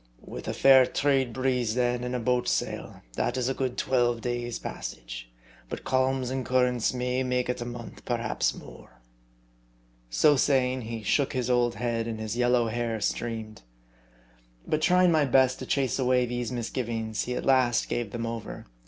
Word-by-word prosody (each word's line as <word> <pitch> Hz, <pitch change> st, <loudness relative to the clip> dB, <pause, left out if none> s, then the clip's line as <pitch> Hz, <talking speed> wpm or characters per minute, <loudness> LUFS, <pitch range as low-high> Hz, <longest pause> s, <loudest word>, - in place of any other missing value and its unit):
With -, -, -8 dB
a -, -, -1 dB
fair 130 Hz, -2 st, +7 dB
trade 135 Hz, -3 st, +1 dB
breeze, 125 Hz, -2 st, 0 dB
then, 125 Hz, -1 st, +1 dB
and 125 Hz, 0 st, -3 dB
a -, -, -1 dB
boat 125 Hz, +1 st, 0 dB
sail, -, -, -2 dB
that 120 Hz, -, -1 dB
is 125 Hz, -1 st, 0 dB
a -, -, 0 dB
good 130 Hz, -2 st, -3 dB
twelve 120 Hz, -2 st, +1 dB
days' 120 Hz, 0 st, -3 dB
passage, -, -, -7 dB, 0.4 s
but -, -, -6 dB
calms 130 Hz, -1 st, +1 dB
and 130 Hz, 0 st, -2 dB
currents 125 Hz, -2 st, +2 dB
may 125 Hz, 0 st, -1 dB
make 125 Hz, -1 st, 0 dB
it 125 Hz, 0 st, -2 dB
a -, -, -3 dB
month, 120 Hz, -1 st, -8 dB
perhaps 115 Hz, -2 st, -1 dB
more." -, -, -13 dB, 1.1 s
So 145 Hz, -, +4 dB
saying, 130 Hz, -2 st, +2 dB
he 115 Hz, -1 st, -6 dB
shook 140 Hz, +5 st, +1 dB
his 125 Hz, -1 st, -1 dB
old 120 Hz, -2 st, +2 dB
head, 115 Hz, 0 st, -2 dB
and 110 Hz, -1 st, -4 dB
his 110 Hz, 0 st, -4 dB
yellow 120 Hz, -1 st, +2 dB
hair 115 Hz, 0 st, -2 dB
streamed. 110 Hz, 0 st, -3 dB, 1.0 s
But 155 Hz, -, 0 dB
trying 180 Hz, +1 st, +4 dB
my 155 Hz, -3 st, +3 dB
best 130 Hz, 0 st, +3 dB
to -, -, -7 dB
chase 135 Hz, -1 st, 0 dB
away 125 Hz, -1 st, +3 dB
these 120 Hz, -1 st, -3 dB
misgivings, 115 Hz, -2 st, -3 dB
he 125 Hz, -, -3 dB
at -, -, -4 dB
last 130 Hz, -3 st, +3 dB
gave 120 Hz, -3 st, -2 dB
them 115 Hz, -1 st, -3 dB
over. 115 Hz, -1 st, -6 dB
125 Hz, 175 wpm, -27 LUFS, 115-130 Hz, 1.1 s, fair